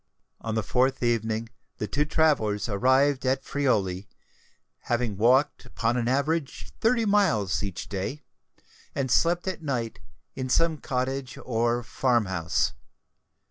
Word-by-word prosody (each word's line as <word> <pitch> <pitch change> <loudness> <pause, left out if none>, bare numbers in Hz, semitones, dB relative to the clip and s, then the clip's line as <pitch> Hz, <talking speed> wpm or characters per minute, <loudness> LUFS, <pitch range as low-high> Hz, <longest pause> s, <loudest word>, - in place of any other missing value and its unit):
On 110 -1 -4
the 110 - 0
fourth 125 +5 +1
evening 115 -1 0 0.3
the - - -2
two 145 +7 0
travellers 140 -10 +1
arrived 130 +6 +3
at 130 +1 +1
Friuli, 100 -9 0 0.8
having 120 -3 0
walked 130 +7 +3
upon 115 +1 -1
an 120 -2 0
average 140 +3 -1
thirty 230 0 +3
miles 155 - +2
each 100 -4 -5
day, 105 +10 -4 0.7
and 130 -3 -1
slept 175 +6 +2
at 185 -3 -3
night 125 -7 -3 0.4
in 130 -1 -4
some 160 +3 +2
cottage 130 0 -3
or 120 0 0
farm 120 -1 +1
house. 90 -1 0
125 Hz, 130 wpm, -26 LUFS, 110-145 Hz, 0.8 s, arrived